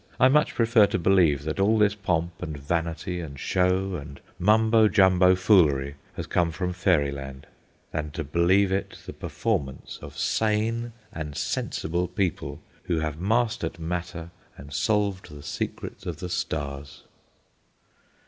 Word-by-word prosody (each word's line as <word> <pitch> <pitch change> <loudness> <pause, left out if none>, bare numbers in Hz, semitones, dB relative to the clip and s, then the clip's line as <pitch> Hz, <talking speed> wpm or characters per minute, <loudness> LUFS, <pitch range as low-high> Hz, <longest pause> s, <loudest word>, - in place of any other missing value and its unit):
I 130 - +6
much 150 +2 +3
prefer 115 -2 +5
to - - -1
believe 85 -6 +3
that 80 +4 -3
all 105 +3 +4
this 105 -1 +4
pomp, 85 -4 -2
and 75 -2 -5
vanity, 85 +4 -2
and 70 -5 -7
show, 95 +3 +1
and 70 -1 -9 0.2
mumbo 110 +3 +5
jumbo 95 -2 +5
foolery 80 -9 +3 0.2
has - - -4
come 85 -1 +1
from 90 +2 -3
fairyland, 70 -7 0 0.5
than 75 -1 -3
to 80 -1 -3
believe 90 +6 +3
it 95 +1 -2
the - - -7
performance 65 -2 -3
of - - -10
sane 110 +2 0 0.2
and 75 -3 -5
sensible 85 +3 -2
people 90 0 -2 0.3
who 85 - 0
have 80 0 -3
mastered 110 -5 0
matter 85 0 -5 0.3
and 75 +1 -11
solved 100 -2 0
the 75 -1 -11
secrets - - -5
of 85 -3 -4
the 90 +2 -6
stars. 70 -4 -4
90 Hz, 140 wpm, -26 LUFS, 75-100 Hz, 0.5 s, I